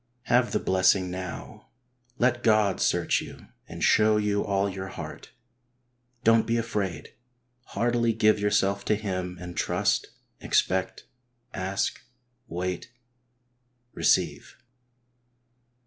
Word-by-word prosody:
Have 125 -1 +2
the - - +1
blessing 95 0 +2
now. 90 -1 -7 0.5
Let 120 0 +2
God 110 -4 +3
search - - +1
you - - -11 0.2
and - - -6
show 110 0 +4
you 105 -1 0
all 100 0 0
your 95 -1 -5
heart. 95 - -8 0.9
Don't 115 0 +4
be 115 0 +1
afraid. 105 -6 -3 0.6
Heartily 120 0 +2
give 110 -1 +3
yourself 100 -1 +1
to 105 - +2
Him 95 -3 -4
and 90 -1 -8
trust, - - 0 0.3
expect, 95 0 0 0.5
ask, 95 +1 -2 0.5
wait, 90 +2 -4 1.0
receive. - - +1
100 Hz, 105 wpm, -26 LUFS, 95-110 Hz, 1.0 s, show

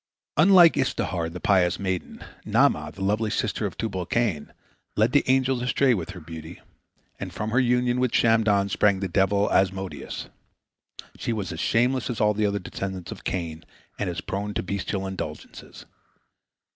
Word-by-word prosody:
Unlike 175 +1 +7
Istehar, 95 -10 -1
the 90 +2 -8
pious 90 -3 +2
maiden, 95 -2 -4 0.2
Naamah, - - +2
the 95 - -7
lovely 105 +3 +1
sister 105 0 -1
of 95 - -10
Tubal 95 -6 -3
cain, 105 -12 -1 0.4
led 110 +3 +3
the 145 - +4
angels 130 -1 +2
astray 130 +1 +2
with 90 -6 -3
her 95 -1 -8
beauty, 80 +1 -9 0.6
and - - -5
from 105 +1 -4
her 120 - +3
union 125 0 +2
with 125 -2 +1
Shamdon 110 -3 +3
sprang 100 -1 +2
the 95 - -2
devil 100 +2 +2
Asmodeus. 95 0 -1 0.9
She 115 - -2
was 105 -4 -3
as 80 - -6
shameless 125 +5 +1
as 120 - -3
all 105 0 +3
the 105 0 +1
other 100 0 -1
descendants 95 -2 -6
of - - -9
Cain, 80 -3 -4 0.4
and 100 - -1
as 85 0 -4
prone 100 +2 -4
to - - -1
bestial 95 +1 -3
indulgences. 90 -5 -7
100 Hz, 165 wpm, -25 LUFS, 95-120 Hz, 0.9 s, Unlike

